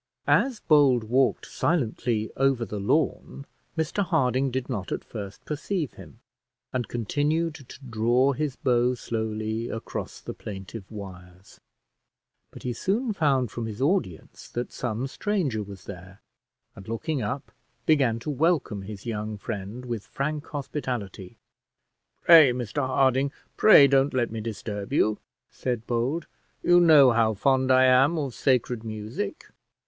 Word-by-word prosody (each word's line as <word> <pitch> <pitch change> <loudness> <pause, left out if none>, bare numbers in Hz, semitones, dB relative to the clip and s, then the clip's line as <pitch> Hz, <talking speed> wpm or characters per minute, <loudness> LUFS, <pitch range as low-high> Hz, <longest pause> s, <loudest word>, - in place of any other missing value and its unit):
As 260 -5 +2
Bold 140 -6 +4
walked 125 +4 +1
silently 120 -7 -1
over 135 -3 +2
the 105 0 -5
lawn, 140 +4 -1 0.3
Mr 160 +6 0
Harding 135 -6 +1
did 130 0 -3
not 105 -8 -4
at - - -3
first 100 -3 -8
perceive 155 +1 -3
him, 115 - -14 0.5
and 125 -2 -1
continued 150 +8 -1
to 135 -3 -12
draw 120 +4 +2
his 145 -1 -2
bow 125 -1 +2
slowly 110 0 -3
across 115 - -6
the - - -7
plaintive 100 0 -8
wires; 95 -3 -11 0.9
but - - -13
he 125 - -2
soon 215 - -1
found 135 - +1
from 115 0 -4
his 110 0 -7
audience 140 - -2
that 120 +1 -4
some 120 0 -3
stranger 145 - -1
was 100 -2 -9
there, 95 0 -10 0.6
and 95 - -12
looking 125 +6 -2
up, 115 +6 -4 0.3
began 135 -7 +3
to 150 - -3
welcome 145 - +1
his 100 0 -9
young 110 -2 -4
friend 105 +5 -6
with 120 -4 -5
frank 150 +2 -3
hospitality. 125 - -5 0.9
"Pray, 160 -6 +8
Mr 125 +3 -2
Harding 135 +1 +2 0.2
pray 190 -10 +8
don't 135 0 +3
let 120 -3 +1
me 110 -1 -4
disturb 105 -2 -5
you," 110 -1 +2 0.3
said 120 -3 -3
Bold; 125 +7 -1 0.4
"you 175 0 +6
know 150 -7 +7
how 110 -2 +2
fond 130 +4 +2
I 130 0 +6
am 130 +6 +5
of 140 -5 -2
sacred 125 -3 0
music." 110 -1 -5
125 Hz, 140 wpm, -26 LUFS, 110-140 Hz, 0.9 s, Pray